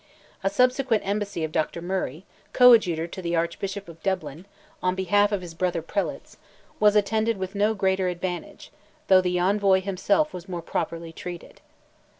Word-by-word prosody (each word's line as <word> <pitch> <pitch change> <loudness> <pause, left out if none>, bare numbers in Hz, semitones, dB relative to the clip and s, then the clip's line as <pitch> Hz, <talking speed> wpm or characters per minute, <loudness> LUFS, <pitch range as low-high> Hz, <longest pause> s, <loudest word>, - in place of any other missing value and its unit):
A 195 - +2
subsequent 250 0 +2
embassy 200 -4 -2
of 160 - -3
Dr. 155 +2 -1
Murray, 175 -2 -3 0.3
coadjutor 215 -10 +6
to 175 +2 -8
the 170 -1 -1
Archbishop 195 +4 -3
of 165 -1 -13
Dublin, 175 -2 -3 0.3
on 185 0 0
behalf 205 +2 +2
of 200 -2 -1
his 170 -2 -8
brother 170 -1 -1
prelates, 200 +4 -4 0.4
was 210 0 +5
attended 220 +2 +1
with 190 0 -5
no 210 +2 +1
greater 190 -1 +1
advantage, 180 0 -5 0.4
though 190 -1 +7
the 180 -1 0
envoy 195 +1 +3
himself 200 +10 0
was 180 +1 -8
more 175 -2 -5
properly 165 0 -4
treated. 175 0 -9
190 Hz, 155 wpm, -25 LUFS, 170-205 Hz, 0.4 s, though